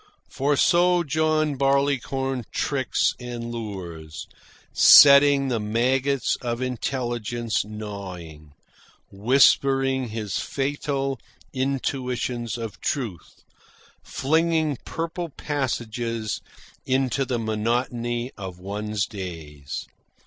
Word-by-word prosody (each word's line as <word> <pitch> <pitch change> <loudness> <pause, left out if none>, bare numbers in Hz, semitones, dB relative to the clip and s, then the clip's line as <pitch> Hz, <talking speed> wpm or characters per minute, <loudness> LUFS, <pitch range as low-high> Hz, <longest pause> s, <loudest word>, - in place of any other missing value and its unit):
For 140 +1 +1
so 175 +1 +4
John 155 -1 +1
Barleycorn 135 -2 0
tricks 135 -2 0
and 120 -1 -6
lures, 90 -9 -7 0.5
setting 140 -1 +8
the 120 -3 0
maggots 130 +5 +1
of 120 -1 -2
intelligence 120 -2 -2
gnawing, 95 -8 -8 0.6
whispering 135 +4 +3
his 105 -2 -3
fatal 135 -1 -2 0.3
intuitions 125 -3 -2
of 115 -2 -7
truth, 110 - -4 0.6
flinging 160 -1 +1
purple 165 +1 -4
passages 120 -6 -3 0.4
into 130 +1 +1
the 125 -2 -2
monotony 120 +2 -1
of 95 -3 -7
one's 105 +2 -3
days. 80 -8 -7
125 Hz, 85 wpm, -24 LUFS, 110-140 Hz, 0.6 s, setting